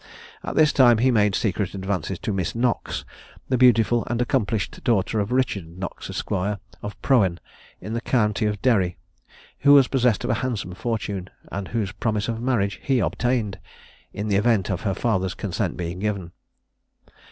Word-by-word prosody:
At - - -4
this 155 -1 +5
time 120 -4 +6
he 130 +3 +3
made 105 -4 +3
secret 100 -2 -1
advances 95 -1 -2
to 105 - -3
Miss 95 0 -2
Knox, 120 +1 -1 0.4
the 130 - +2
beautiful 120 -2 +4
and 120 0 -1
accomplished 115 -4 -1
daughter 110 -3 +1
of 100 +3 -2
Richard 100 -10 -1
Knox, 95 -1 -6
Esq. - - -5
of 100 +1 -4
Prohen 95 -10 +3 0.4
in 110 - -6
the 115 - -2
county 110 -3 +1
of 105 -1 -2
Derry, 95 -8 +2 0.6
who 140 +1 +6
was 140 -3 +7
possessed 125 -5 +2
of - - 0
a 120 +2 -1
handsome 115 -8 -3
fortune, 100 -3 -3 0.2
and 100 -1 -4
whose 110 -4 -2
promise 105 0 -1
of 115 -1 -3
marriage 110 -6 0
he 135 -2 +1
obtained, 115 +2 0 0.5
in 105 +2 -4
the 100 -2 +2
event 105 -2 +2
of 95 - -2
her 100 -4 -1
father's 95 -5 0
consent 95 -2 -2
being 90 0 -4
given. 100 -4 -2
105 Hz, 170 wpm, -24 LUFS, 95-120 Hz, 0.6 s, was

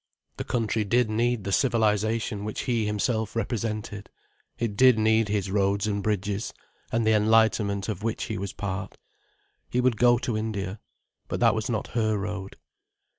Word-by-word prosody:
The - - -3
country 115 -2 0
did 115 +2 +2
need 120 0 +1
the 100 - -3
civilization 110 -2 +1
which 110 0 -3
he 115 -5 0
himself 110 +1 -1
represented: 110 -2 -3 0.5
it 115 -4 -2
did 130 +1 +6
need 110 0 +3
his 100 -2 -1
roads 100 0 +1
and 100 -1 -1
bridges, 100 0 -2 0.4
and 115 0 +1
the 110 - +4
enlightenment 105 -2 +3
of 105 -4 -4
which 115 0 -2
he 110 - -4
was 100 0 -4
part. 100 -1 -5 0.7
He 125 - 0
would 125 -3 +2
go 120 +1 +5
to 120 -1 -2
India. 110 -2 -3 0.5
But - - -3
that 115 -2 +5
was 110 +1 -2
not 110 -3 -2
her 110 -2 0
road. 100 -1 -5
110 Hz, 165 wpm, -26 LUFS, 100-115 Hz, 0.7 s, did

